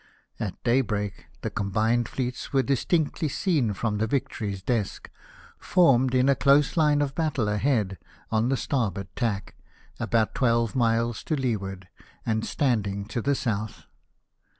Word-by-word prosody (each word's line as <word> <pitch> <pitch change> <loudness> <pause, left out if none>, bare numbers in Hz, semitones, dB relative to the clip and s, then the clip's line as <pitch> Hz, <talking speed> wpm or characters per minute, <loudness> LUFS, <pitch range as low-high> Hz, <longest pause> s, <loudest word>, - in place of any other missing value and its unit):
At 100 -4 -3
daybreak 110 -5 0
the - - -3
combined 110 +4 0
fleets 125 -1 -4
were 135 -2 +3
distinctly 155 +4 0
seen 140 - 0
from 105 +1 -1
the 110 - +1
Vic 135 +2 0
tory 105 -2 -4
s 95 - -11
deck, 110 -3 -2 0.5
formed 130 -8 +3
in 130 +1 +4
a 140 - +6
close 140 +1 +3
line 150 -3 +3
of 135 -1 -3
battle 150 -8 0
ahead 105 -3 0 0.3
on 110 +2 +2
the 135 - +1
starboard 100 -10 -2
tack, 105 -5 -2 0.5
about 115 -2 +1
twelve 115 -3 +1
miles 115 -1 +1
to 155 - 0
leeward, 100 -8 -3 0.4
and 110 -1 0
standing 100 -7 0
to 120 - -2
the 140 +4 +1
south. 110 -5 -3
120 Hz, 150 wpm, -26 LUFS, 105-135 Hz, 0.5 s, a